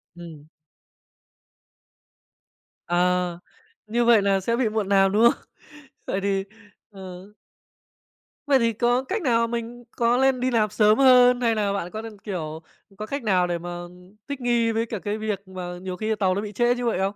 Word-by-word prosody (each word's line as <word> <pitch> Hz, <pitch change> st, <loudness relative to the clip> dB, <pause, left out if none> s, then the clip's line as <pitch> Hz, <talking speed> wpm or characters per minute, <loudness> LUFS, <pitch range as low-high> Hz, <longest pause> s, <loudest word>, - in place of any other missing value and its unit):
Ừm. 165 Hz, -4 st, -11 dB, 2.4 s
Ờ. 180 Hz, 0 st, 0 dB, 0.5 s
Như 235 Hz, +2 st, 0 dB
vậy 230 Hz, -3 st, +5 dB
nà 195 Hz, -1 st, +2 dB
sẽ 230 Hz, +5 st, -1 dB
bị 235 Hz, -2 st, 0 dB
muộn 215 Hz, -2 st, -2 dB
làm, 195 Hz, -1 st, +4 dB
đúng 210 Hz, +3 st, +2 dB
không? -, -, -11 dB, 0.6 s
Vậy 195 Hz, -, -2 dB
thì, 195 Hz, -1 st, 0 dB, 0.5 s
ờ 190 Hz, 0 st, -11 dB, 1.1 s
Vậy 275 Hz, -3 st, +4 dB
thì 230 Hz, -1 st, +1 dB
có 240 Hz, +4 st, +1 dB
cách 405 Hz, +10 st, -3 dB
nào? 230 Hz, -6 st, +2 dB
Mình 235 Hz, +1 st, -5 dB
có 235 Hz, +1 st, +1 dB
lên 265 Hz, 0 st, +2 dB
đi 255 Hz, +1 st, 0 dB
làm 220 Hz, -3 st, +2 dB
sớm 215 Hz, +2 st, +3 dB
hơn 250 Hz, -2 st, +6 dB
hay 230 Hz, -2 st, +2 dB
nà 205 Hz, -2 st, 0 dB
bạn 180 Hz, -3 st, -4 dB
có 215 Hz, -, -5 dB
nên 225 Hz, -2 st, -10 dB
kiểu, 160 Hz, -6 st, -6 dB, 0.4 s
có 210 Hz, -, -5 dB
cách 280 Hz, +4 st, -5 dB
nào 185 Hz, -4 st, +2 dB
để 175 Hz, -1 st, -2 dB
mà 175 Hz, +1 st, -8 dB, 0.6 s
thích 280 Hz, -2 st, -5 dB
nghi 235 Hz, -2 st, +1 dB
với 225 Hz, +1 st, -1 dB
cả 225 Hz, -2 st, -5 dB
cái 205 Hz, +3 st, -3 dB
việc 210 Hz, -2 st, -4 dB
mà 180 Hz, -1 st, -7 dB
nhiều 185 Hz, -1 st, -6 dB
khi 215 Hz, +1 st, -1 dB
tàu 185 Hz, -2 st, +1 dB
nó 200 Hz, -, -1 dB
bị 210 Hz, -1 st, -6 dB
trễ 240 Hz, +4 st, +2 dB
như 245 Hz, 0 st, -4 dB
vậy 230 Hz, -, 0 dB
không? 195 Hz, +2 st, -1 dB
215 Hz, 185 wpm, -24 LUFS, 190-240 Hz, 2.4 s, hơn